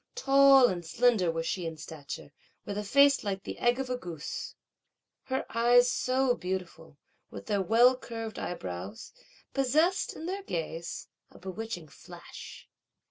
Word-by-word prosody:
Tall 275 - +6
and 175 -5 -3
slender 215 +1 +2
was 165 0 -2
she 180 -1 -2
in 160 -1 -6
stature, 150 -2 -8 0.3
with 205 - -4
a 210 - -2
face 280 +6 +4
like 195 -2 -3
the - - -7
egg 240 +2 +2
of 270 - -2
a 250 - -1
goose. 170 -9 -6 0.7
Her 265 0 -2
eyes 245 +1 +5
so 260 -1 +1
beautiful, 180 -6 -6 0.3
with - - -9
their 205 -2 0
well 235 +6 +5
curved 225 -3 -7
eyebrows, 95 - -6 0.4
possessed 305 +8 +1
in 320 - -7
their 385 +3 -3
gaze 165 - -5 0.2
a - - -17
bewitching 190 -1 -6
flash. 145 - -12
220 Hz, 145 wpm, -29 LUFS, 170-255 Hz, 0.7 s, Tall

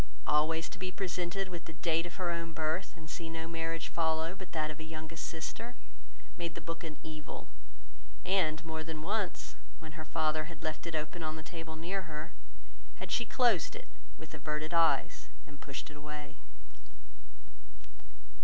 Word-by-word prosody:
Always 160 +2 +4
to - - -7
be 185 0 0
presented 185 0 0
with 175 -2 -5
the 165 - -6
date 165 +1 +3
of 175 - -8
her 180 -2 +2
own 170 -1 -1
birth 160 +4 +1
and 160 -1 -8
see 165 +2 -3
no 165 0 -2
marriage 165 0 0
follow 160 0 +2
but 190 -1 -8
that 155 -1 +2
of 155 - -8
a - - -3
youngest 160 +1 -4
sister, 225 +9 -3 0.6
made 170 -2 -1
the - - -2
book 165 0 -2
an 160 -2 -4
evil; 155 -2 -6 0.8
and 170 -4 +4
more 160 0 -1
than 155 -1 -3
once, 205 0 0 0.2
when 160 -1 -8
her 155 0 -5
father 155 -1 +2
had 165 -1 -8
left 155 +2 -1
it 165 - -1
open 155 +3 -1
on 155 -1 0
the 160 - -5
table 165 -2 -5
near 180 +5 0
her, 155 +2 -3 0.6
had - - -5
she 235 - +3
closed 230 -9 +5
it, - - -7 0.3
with 160 - -9
averted 155 +1 -1
eyes, 165 -5 +5 0.2
and 145 -1 -12
pushed 140 +2 -4
it 150 - -8
away. 150 0 -5
160 Hz, 175 wpm, -35 LUFS, 155-170 Hz, 0.8 s, closed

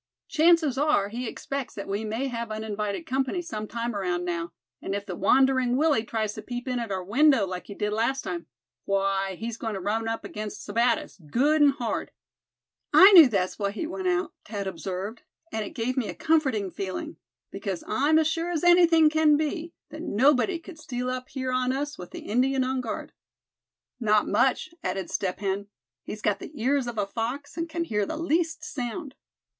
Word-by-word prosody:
Chances 315 -4 +4
are 290 -10 +2
he 240 +3 -4
expects 275 +3 -5
that 200 - -6
we 200 +2 -2
may 220 +5 -2
have 235 -3 -3
uninvited 215 +4 -3
company 265 +3 -1
some 215 -12 -5
time 235 0 -3
around 180 -3 -1
now; 170 -1 -3 0.3
and 195 - -3
if 200 0 -4
the 185 -4 -5
Wandering 260 +4 +3
Willy 295 -6 +3
tries 220 -2 -2
to - - -7
peep 245 +1 -6
in 250 -1 -1
at 230 -2 -4
our 190 -1 -2
window 270 +4 +4
like 180 -1 -6
he 200 - -8
did 210 0 -1
last 235 +5 0
time, 175 -1 -5 0.4
why, 195 -1 0
he's 225 +4 -5
goin' 225 -3 -3
to - - -3
run 220 +4 -1
up 225 0 -3
against 210 0 -6
Sebattis, 230 -2 0
good 295 - +3
and 285 -1 +6
hard." 245 -5 -3 0.8
"I 385 +2 +9
knew 340 -7 +10
that 200 -6 +2
was 185 - -7
why 200 -1 0
he 215 +11 -4
went 365 +3 -4
out," 365 +1 0
Thad 205 -2 -5
observed, 190 +4 -5 0.3
"and 220 - -2
it 205 - -8
gave 245 +2 -1
me 245 -5 0
a - - -5
comforting 270 - +1
feeling; 185 -2 -5 0.3
because 195 -2 -4
I'm 295 +4 +3
as 320 - +4
sure 330 +2 -1
as 340 -3 -2
anything 345 -2 +6
can 305 -1 +4
be, 315 +2 -2 0.2
that 310 - -7
nobody 285 - +3
could 330 -1 -12
steal 250 -3 -3
up 255 0 -5
here 260 -2 -3
on 255 0 +1
us 290 +2 -3
with 180 - -8
the - - -8
Indian 260 +4 +1
on 260 0 -1
guard." 225 -3 -5 0.9
"Not 215 -3 +3
much," 255 +8 +2
added 185 -1 -3
Step 190 0 -2
Hen. 200 0 -2 0.3
"He's 210 - -8
got 205 - +1
the 290 - -10
ears 265 +2 +1
of 235 -2 -5
a 205 - +1
fox, 240 +7 -4
and 335 0 -3
can 335 +1 -2
hear 210 -10 -1
the 315 - -4
least 325 0 0
sound." 275 +1 -5
240 Hz, 200 wpm, -26 LUFS, 205-295 Hz, 0.9 s, knew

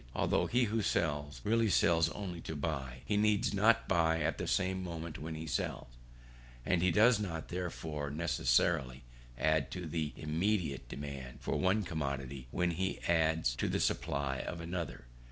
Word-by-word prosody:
Although - - +2
he 125 +1 +3
who 110 0 0
sells, 75 -6 -1
really 115 +1 +3
sells 85 -3 +4
only 90 -5 -5
to 80 - -5
buy, 70 -5 -3
he 105 - +1
needs 105 +2 +2
not 110 +3 +4
buy 80 -2 +3
at - - -1
the - - -2
same 95 0 +1
moment 85 -3 -5
when 80 +2 -5
he 80 +1 -5
sells; 65 -4 -2 0.8
and 90 -2 +2
he 90 - +4
does 105 +5 +5
not 85 -6 -4
therefore 80 -5 -4
necessarily 70 -3 +1 0.3
add 80 +2 +2
to 90 -2 -5
the 80 -2 -2
immediate 80 - -1
demand 70 -3 -7
for - - -1
one 100 +3 +2
commodity 70 -5 -4
when 90 +5 +1
he 95 +3 -2
adds 80 -5 +2
to - - 0
the - - 0
supply 70 -2 0
of 85 - -5
another. 85 -6 -4
80 Hz, 165 wpm, -33 LUFS, 75-95 Hz, 0.8 s, does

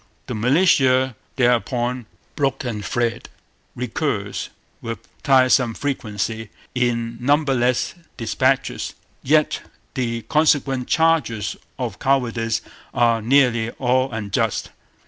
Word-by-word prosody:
'The - - -5
militia 130 - +3 0.2
thereupon 125 -1 +1 0.3
broke 140 -2 0
and 110 -5 -4
fled' 115 +3 -2 0.5
recurs 120 -4 -2 0.3
with 115 0 -4 0.2
tiresome 130 -3 +4
frequency 110 -5 -3 0.2
in 115 -2 0
numberless 130 -3 +2 0.2
dispatches. 130 +3 0 0.3
Yet 155 +2 +2 0.3
the 115 -3 -2
consequent 145 -4 +2
charges 150 -11 +1 0.2
of - - -4
cowardice 115 -4 +1 0.3
are 115 -1 +3
nearly 120 -2 +3
all 130 +1 +1
unjust. 105 -4 -1
125 Hz, 90 wpm, -22 LUFS, 115-135 Hz, 0.5 s, tiresome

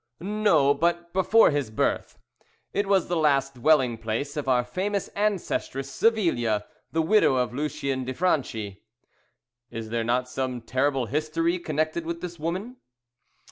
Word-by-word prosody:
"No, 185 -7 +3
but 170 +1 -1
before 190 +3 +5
his 145 -5 -1
birth. 110 - -1 0.6
It 205 0 0
was 195 -3 +2
the 175 - -1
last 140 -4 +2
dwelling 125 -3 +2
place 115 +6 -3
of 150 -2 -4
our 125 -2 +3
famous 195 +10 -2
ancestress 185 -9 -2
Savilia, 135 - +1 0.3
the 160 0 +1
widow 180 -5 +4
of 125 -1 0
Lucien 140 -1 -2
de 130 - -3
Franchi." 115 - -1 0.9
"Is 115 -1 -6
there 115 -1 0
not 125 +2 0
some 130 -1 -3
terrible 130 +2 0
history 155 +6 -1
connected 155 0 -1
with 170 0 -3
this 175 -2 -7
woman?" 185 +11 -4
150 Hz, 140 wpm, -26 LUFS, 125-175 Hz, 0.9 s, before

